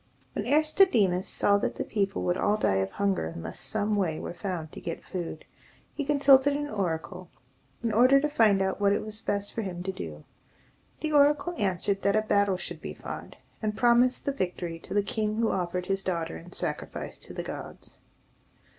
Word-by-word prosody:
When -, -, -3 dB
Aristodemus 290 Hz, -, +3 dB
saw 200 Hz, 0 st, +2 dB
that -, -, -2 dB
the -, -, -2 dB
people 200 Hz, -2 st, -1 dB
would 175 Hz, -, +1 dB
all 205 Hz, +3 st, +2 dB
die 95 Hz, -, +2 dB
of 95 Hz, 0 st, 0 dB
hunger 195 Hz, -, 0 dB
unless 85 Hz, -, -7 dB
some 215 Hz, 0 st, 0 dB
way 175 Hz, -6 st, 0 dB
were -, -, -5 dB
found 175 Hz, -4 st, -4 dB
to -, -, -9 dB
get 165 Hz, -, -5 dB
food, 170 Hz, -4 st, -5 dB, 0.5 s
he 295 Hz, -, -3 dB
consulted 280 Hz, -1 st, +5 dB
an 290 Hz, 0 st, -3 dB
oracle, 180 Hz, -, -3 dB, 0.5 s
in 230 Hz, -, +1 dB
order 255 Hz, +5 st, +6 dB
to 300 Hz, -, +1 dB
find 215 Hz, -9 st, +3 dB
out 190 Hz, +1 st, -2 dB
what 200 Hz, 0 st, +4 dB
it -, -, -1 dB
was 215 Hz, 0 st, -2 dB
best 205 Hz, -1 st, -2 dB
for 225 Hz, -, -2 dB
him 180 Hz, -4 st, -5 dB
to 190 Hz, -, -2 dB
do. 75 Hz, -, -7 dB, 0.8 s
The 310 Hz, -, -1 dB
oracle 295 Hz, +4 st, +4 dB
answered 195 Hz, -, 0 dB
that 200 Hz, +1 st, +2 dB
a 215 Hz, -, +3 dB
battle 200 Hz, -3 st, +2 dB
should -, -, -6 dB
be -, -, -6 dB
fought, -, -, -8 dB, 0.3 s
and 215 Hz, -1 st, -2 dB
promised 240 Hz, +2 st, +4 dB
the 280 Hz, -, +1 dB
victory 180 Hz, -7 st, -3 dB
to -, -, -7 dB
the 205 Hz, -, +3 dB
king 215 Hz, +1 st, -1 dB
who 225 Hz, 0 st, +1 dB
offered 180 Hz, 0 st, -2 dB
his 195 Hz, +1 st, -1 dB
daughter 170 Hz, -, -2 dB
in 80 Hz, -, -11 dB
sacrifice -, -, -4 dB
to -, -, -8 dB
the -, -, -3 dB
gods. -, -, -8 dB
200 Hz, 195 wpm, -28 LUFS, 180-230 Hz, 0.8 s, order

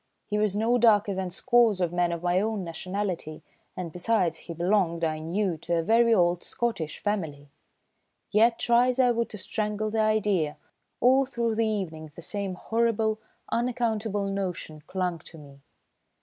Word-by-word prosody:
He 210 Hz, -, -1 dB
was 210 Hz, -2 st, +1 dB
no 230 Hz, +3 st, +2 dB
darker 210 Hz, -3 st, +4 dB
than 190 Hz, -1 st, -3 dB
scores 230 Hz, +1 st, +3 dB
of 175 Hz, -2 st, 0 dB
men 175 Hz, -1 st, +1 dB
of 170 Hz, 0 st, -4 dB
my 180 Hz, +1 st, +2 dB
own 215 Hz, -2 st, -2 dB
nationality, 175 Hz, -1 st, -4 dB, 0.3 s
and 180 Hz, -3 st, -4 dB
besides, 180 Hz, -2 st, +1 dB
he 170 Hz, -, -8 dB
belonged, 170 Hz, -1 st, +1 dB
I 155 Hz, -1 st, 0 dB
knew, 175 Hz, +2 st, -1 dB
to 170 Hz, +2 st, -2 dB
a 165 Hz, -, 0 dB
very 230 Hz, +5 st, +4 dB
old 175 Hz, -4 st, +3 dB
Scottish 230 Hz, -, -3 dB
family. 155 Hz, -9 st, -3 dB, 0.8 s
Yet, 230 Hz, +2 st, +4 dB
try 240 Hz, +1 st, +3 dB
as 255 Hz, +1 st, 0 dB
I 250 Hz, -1 st, +5 dB
would 235 Hz, 0 st, -1 dB
to 210 Hz, -, -7 dB
strangle 210 Hz, +1 st, -2 dB
the 220 Hz, -, -1 dB
idea, 210 Hz, -8 st, +1 dB, 0.4 s
all 260 Hz, +2 st, +4 dB
through 235 Hz, -3 st, -1 dB
the 225 Hz, 0 st, +1 dB
evening 165 Hz, -8 st, -4 dB
the 170 Hz, -, -9 dB
same 200 Hz, -1 st, -4 dB
horrible, 225 Hz, +1 st, 0 dB, 0.3 s
unaccountable 225 Hz, -4 st, -1 dB
notion 185 Hz, -6 st, -4 dB
clung 180 Hz, -3 st, -2 dB
to 165 Hz, 0 st, -13 dB
me. 140 Hz, -2 st, -14 dB
200 Hz, 165 wpm, -27 LUFS, 170-225 Hz, 0.8 s, I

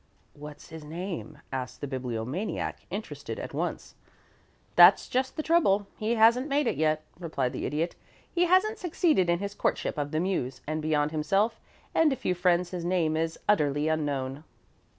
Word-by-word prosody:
"What's 150 Hz, +2 st, -11 dB
his 160 Hz, -1 st, -9 dB
name?" 170 Hz, +4 st, -6 dB
asked 130 Hz, -1 st, -4 dB
the -, -, -4 dB
Bibliomaniac, 130 Hz, -, -4 dB
interested -, -, -6 dB
at -, -, -6 dB
once. -, -, -3 dB, 0.8 s
"That's -, -, +8 dB
just 260 Hz, +3 st, -1 dB
the 310 Hz, -, -1 dB
trouble. 210 Hz, -, +3 dB
He 220 Hz, +2 st, -1 dB
hasn't 235 Hz, +4 st, +5 dB
made 290 Hz, 0 st, +1 dB
it -, -, 0 dB
yet," 155 Hz, +1 st, +1 dB, 0.2 s
replied 140 Hz, -7 st, -2 dB
the -, -, -3 dB
Idiot. 155 Hz, +5 st, -2 dB, 0.4 s
"He 355 Hz, 0 st, +3 dB
hasn't 395 Hz, +5 st, +3 dB
succeeded 315 Hz, -, +2 dB
in 170 Hz, -, +3 dB
his 200 Hz, +2 st, -4 dB
courtship 160 Hz, -, -1 dB
of 145 Hz, 0 st, -2 dB
the 155 Hz, +1 st, -1 dB
Muse, 170 Hz, -8 st, -2 dB
and 155 Hz, +1 st, -2 dB
beyond 150 Hz, -1 st, +1 dB
himself 195 Hz, +8 st, +1 dB, 0.3 s
and 320 Hz, -2 st, +4 dB
a -, -, +1 dB
few 185 Hz, -, -1 dB
friends 180 Hz, 0 st, +1 dB
his 180 Hz, -2 st, -4 dB
name 170 Hz, -3 st, +1 dB
is 160 Hz, +1 st, -1 dB
utterly 150 Hz, -7 st, +2 dB
unknown." 145 Hz, -2 st, -2 dB
170 Hz, 170 wpm, -28 LUFS, 150-215 Hz, 0.8 s, That's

